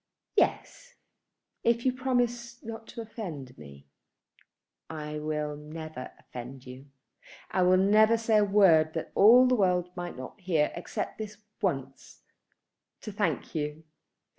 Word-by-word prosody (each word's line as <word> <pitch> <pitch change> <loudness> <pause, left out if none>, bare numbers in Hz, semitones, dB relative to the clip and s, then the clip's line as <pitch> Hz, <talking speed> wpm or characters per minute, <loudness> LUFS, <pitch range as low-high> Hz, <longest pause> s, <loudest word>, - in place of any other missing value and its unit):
"Yes; - - 0 0.7
if 235 +1 +2
you 255 - +3
promise 245 -2 -1
not 225 0 -8
to 235 - -7
offend 170 - -7
me." 70 -1 -13 1.0
"I 150 -1 -5
will 150 -1 -2
never 155 -2 -8
offend 125 +1 -10
you. 130 +2 -11 0.6
I 185 - +1
will 180 +1 +5
never 215 +4 +5
say 225 -1 +2
a - - +4
word 180 -6 +5
that 160 - -4
all 240 +5 +7
the 255 - +3
world 180 -5 +2
might 175 -4 -6
not 130 +10 -9
hear, 165 -5 +1
except 175 - -5
this 215 -1 -6 0.2
once, 135 -8 -4 0.8
to 215 - -6
thank 195 -8 -2
you." 150 0 -3
180 Hz, 135 wpm, -28 LUFS, 150-225 Hz, 1.0 s, all